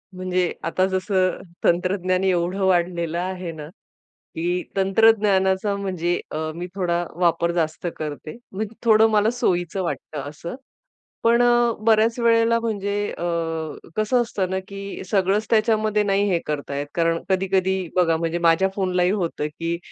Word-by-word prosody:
म्हणजे 185 -1 -1
आता 175 +3 +1
जसं 185 -1 0 0.2
तंत्रज्ञान 185 +1 +1
एवढं 180 0 +1
वाढलेलं 170 -2 +1
आहे 185 -1 -4
ना, 155 -2 -8 0.7
की 175 +2 -1
तंत्रज्ञानाचा 195 -1 +3
म्हणजे 180 -3 -1
अ, - - -3 0.2
मी 175 +1 -5
थोडा 175 -2 0 0.2
वापर 170 0 +2
जास्त 165 0 -1
करते, 155 +3 -6 0.2
मग 210 +2 -4
थोडं 220 0 +6
मला 210 0 +3
सोयीचं 175 -1 0
वाटतं 160 -3 -4
असं. 160 +6 -7 0.7
पण 235 +1 +4
अ, 240 -1 +4
बऱ्याच 225 +1 +3
वेळेला 230 0 +3
म्हणजे 205 -3 -2 0.2
अ, - - -6 0.7
कसं 215 +3 +2
असतं 200 -6 -2
ना, 190 0 -1
की 200 -1 -7
सगळंच 195 +2 +2
त्याच्यामध्ये 215 -1 +2
नाही 200 0 +1
हे 175 -3 +2
करता 145 -2 -4
येत. 145 +1 -3
कारण 165 0 +1
कधी-कधी 190 0 +1 0.2
बघा 170 -3 +3
म्हणजे 165 +1 -1
माझ्या 165 +4 +4
फोनलाही 185 -2 +1
होतं, 170 -7 -2
की 165 +3 -3
185 Hz, 140 wpm, -23 LUFS, 170-205 Hz, 0.7 s, थोडं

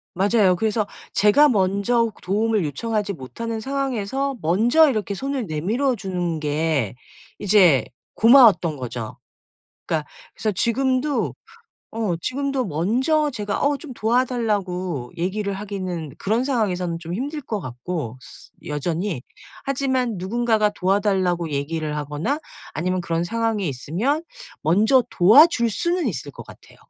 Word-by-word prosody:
맞아요. 195 0 +3
그래서 215 +2 0 0.3
제가 250 +9 +5
먼저 210 +2 +1
도움을 210 0 +1
요청하지 205 - -2
못하는 225 - -5
상황에서 270 +1 -2
먼저 235 - +4
이렇게 215 -5 -2
손을 270 +3 -3
내밀어 220 - 0
주는 180 -5 -3
게 150 -6 -1 0.4
이제 180 - +4 0.3
고마웠던 225 - +6
거죠. 120 -3 -6 0.7
그러니까 155 -2 -2 0.3
그래서 215 - -1
지금도 260 +7 0 0.6
어 220 -6 -1
지금도 275 +2 -1
먼저 250 - +1
제가 205 -5 -3
어 285 0 +2
좀 275 -5 -9
도와 240 +3 +2
달라고 185 - -2
얘기를 200 +3 -2
하기는 185 -6 -5
그런 225 +5 0
상황에서는 185 -10 -1
좀 170 +1 -6
힘들 285 +8 -3
것 220 -6 -4
같고 130 -1 -5
스 125 - -15 0.2
여전히 160 +1 -2 0.4
하지만 260 -4 0
누군가가 220 +3 +1
도와달라고 190 -4 0
얘기를 150 +2 -2
하거나 150 - -2 0.4
아니면 185 +3 -1
그런 170 -1 -1
상황에 225 +1 -1
있으면 180 - -1 0.4
먼저 215 - +4
도와줄 235 - +6
수는 345 - 0
있을 - - -5
것 - - -11
같아요. - - -16
205 Hz, 300 characters per minute, -22 LUFS, 170-245 Hz, 0.7 s, 고마웠던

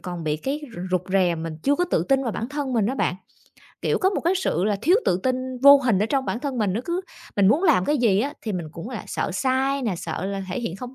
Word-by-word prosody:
còn 175 -3 -6
bị 150 -1 0
cái 270 - -3
r - - -8
rụt 180 -1 +1
rè, 185 -3 +3
mình 165 -1 -5
chưa 285 - +3
có 355 - +1
tự - - +2
tin 270 0 +3
vào 235 -4 -2
bản 225 +5 -4
thân 285 -2 -3
mình 225 -5 +2
á 255 - -1
bạn. 225 - 0 0.7
Kiểu, - - +1
có 380 - +2
một 400 - -2
cái 345 +3 +1
sự 270 - 0
là 210 -1 +1
thiếu 355 +5 +5
tự 180 - +1
tin 255 -1 +1 0.3
vô 280 0 +10
hình 250 -8 +1
ở 210 - +1
trong 270 +1 0
bản 235 - -3
thân 275 -3 -3
mình, 205 -4 +1
nó 215 - -1
cứ 345 +4 -1 0.4
mình 200 -2 +5
muốn 295 - +3
làm 305 - +4
cái 295 - +1
gì 210 -5 +3
á 280 +5 -2
thì 215 - -3
mình 175 -4 -3
cũng 170 +10 -8
là 230 -7 -5
sợ - - -2
sai 265 +6 0
nè, 220 -6 -1
sợ 180 +1 -4
là 195 0 -3
thể 180 - -3
hiện 190 -7 -4
không 250 +5 -8
235 Hz, 290 wpm, -23 LUFS, 190-275 Hz, 0.7 s, vô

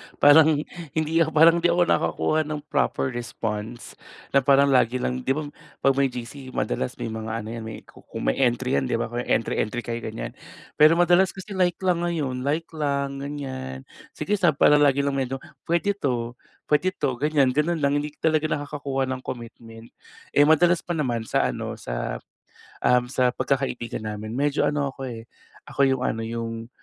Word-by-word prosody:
Parang 150 +1 +6 0.3
hindi 160 +1 +1
parang 165 +2 +5
hindi 175 - +3
ako 175 +1 +3
nakakakuha 155 -2 +1
ng 150 -1 -4
proper 135 -2 0
response 115 -1 -5 0.4
na 140 - +5
parang 140 +1 +4
lagi 125 -2 +3
lang 125 0 -1
'di - - +3
'ba 155 - -2 0.4
'pag 135 - +6
may 135 - +4
GC 125 +2 -8
madalas 110 +3 -2
may 115 - -5
mga 110 0 -4
ano 110 - -7
yan 110 -1 -7
kung - - -10
may - - 0
entry 120 - +2
yan 65 - -3
'di - - 0
'ba? 115 0 -2 0.2
Entry-entry 115 +1 0
kayo 115 0 -4
ganyan 110 -1 -6 0.5
pero, 155 +2 +7
madalas 175 +2 +4
kasi 190 +2 -9
like 180 -3 +1
lang 180 -2 +2
ngayon 150 -7 -2
like 155 +3 0
lang 140 -2 -2
ganyan 130 - -6 0.3
sige 205 - -2
sa 175 -2 +4
parang 150 +1 +5
lagi 140 -1 +4
lang 140 - 0
medyo 135 0 -2 0.3
pwede 170 +4 +2
to, 120 -6 -1 0.4
pwede 150 +5 +3
to 130 - -1
ganyan 145 -3 +3
ganon 155 +4 +1
lang 140 0 +3
hindi 150 +1 -4
talaga 155 -1 +2
nakakakuha 140 -2 -2
ng 130 0 -3
commitment. 115 -2 -9 0.4
Eh, 145 0 +5
madalas 170 +3 +4
pa 175 - -4
naman 120 -6 -1
sa - - +1
ano, - - -4
sa - - -4 0.7
um, 125 0 +4
sa 125 -1 +2
pagkakaibigan 130 -5 -2
namin 110 +1 -5
medyo 145 +2 +1
ano 145 -2 -1
ako 135 0 -7
eh 115 -2 -7 0.4
ako - - -8
yung 130 -1 0
ano 115 - -1
yung 115 0 -5
135 Hz, 175 wpm, -24 LUFS, 120-155 Hz, 0.7 s, pero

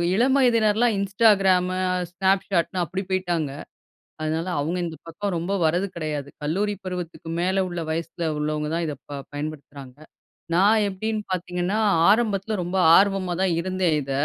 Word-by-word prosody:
இளம் 260 +5 +3
வயதினர்லாம் 230 -2 +3
இன்ஸ்டாகிராம், 195 -3 +3 0.4
ஸ்னாப்ஷாட்ன்னு 190 -1 +1
அப்படி 190 +5 -4
போய்ட்டாங்க. 175 -6 -1 0.7
அதனால 160 +2 -2
அவங்க 165 +5 -2
இந்த 160 -1 -5
பக்கம் 200 +4 -4
ரொம்ப 175 +4 -3
வர்றது 175 +5 +1
கெடையாது. 150 -3 -4
கல்லூரி 200 +7 0
பருவத்துக்கு 180 -3 -6
மேல 190 +2 +1
உள்ள 175 -1 -5
வயசில 165 +1 -3
உள்ளவங்க 150 0 -1
தான் 170 - 0
இத 150 - -3 0.2
ப 145 - -5 0.2
பயன்படுத்துறாங்க. 145 -3 -7 0.6
நான் 205 +5 +5
எப்படின்னு 215 +3 -3
பார்த்தீங்கன்னா, 180 +2 -2 0.3
ஆரம்பத்தில 215 -1 +2
ரொம்ப 180 +2 -3 0.2
ஆர்வமா 195 -2 +2
தான் 185 -2 +2
இருந்தேன், 185 -2 0
இத. 135 - -6
180 Hz, 135 wpm, -24 LUFS, 165-200 Hz, 0.7 s, நான்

